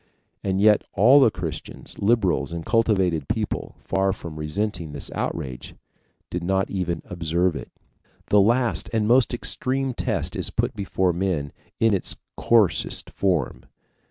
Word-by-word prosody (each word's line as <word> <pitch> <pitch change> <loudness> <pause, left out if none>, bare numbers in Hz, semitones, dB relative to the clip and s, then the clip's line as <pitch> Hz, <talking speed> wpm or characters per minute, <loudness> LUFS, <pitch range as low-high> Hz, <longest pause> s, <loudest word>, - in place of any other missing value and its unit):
And 95 -1 0
yet 105 0 +5
all 125 +8 +6
the 130 - +6
Christians, - - -6
liberals, 100 - +1
and 85 -1 -5
cultivated 95 - +1
people, - - -3
far 95 0 +1
from 80 -4 -8
resenting 85 0 -3
this 70 - -3
outrage, 65 -2 -4 0.6
did 90 0 -3
not 95 +2 0
even 90 -3 -2
observe 85 0 0
it. - - -7 0.6
The 105 - +6
last, 120 +4 +1
the 110 -2 +1
most 120 +4 +4
extreme 130 +2 -1
test 95 - -2
is - - -2
put - - -1
before 95 -3 0
men 85 -6 -1 0.3
in 115 -1 +4
its 95 - -1 0.2
coarsest 100 -10 +1
form. 85 -10 -1
95 Hz, 140 wpm, -24 LUFS, 85-110 Hz, 0.6 s, all